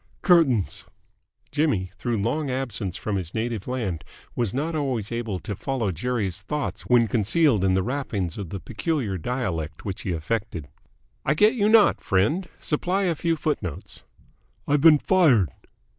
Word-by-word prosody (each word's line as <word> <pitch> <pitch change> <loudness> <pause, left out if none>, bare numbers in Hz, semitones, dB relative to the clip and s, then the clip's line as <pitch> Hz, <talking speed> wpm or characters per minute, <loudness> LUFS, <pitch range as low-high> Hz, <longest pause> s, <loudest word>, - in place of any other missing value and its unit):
"Curtains!" 150 - +3 0.7
Jimmy, 130 - 0
through 120 -2 -2
long 145 +6 -1
absence 120 -8 -3
from 105 -2 -2
his 90 -3 -5
native 115 -3 -2
land, 110 -10 -3 0.3
was 120 -5 0
not 150 +7 -2
always 130 -8 -2
able 115 -4 -2
to 100 +3 -5
follow 120 -3 -2
Jerry's 100 0 -2
thoughts 150 +7 -4
when 120 -2 +4
concealed 115 - +2
in 95 -1 +3
the 95 - +2
wrappings 110 - -3
of 95 -5 -5
the 100 - -5
peculiar 120 - -2
dialect 85 - -3
which 100 -1 -4
he 95 - -3
affected. 85 -1 -3 0.6
"I 150 - +1
get 210 +7 +5
you 210 -4 +2
not, 220 -2 +5
friend. 150 - +1
Supply 180 +6 -1
a 180 -3 +2
few 165 +1 0
footnotes." 150 - -4 0.7
"I've 145 0 +2
been 155 -1 +8
fired." 140 - +3
120 Hz, 155 wpm, -25 LUFS, 95-150 Hz, 0.7 s, been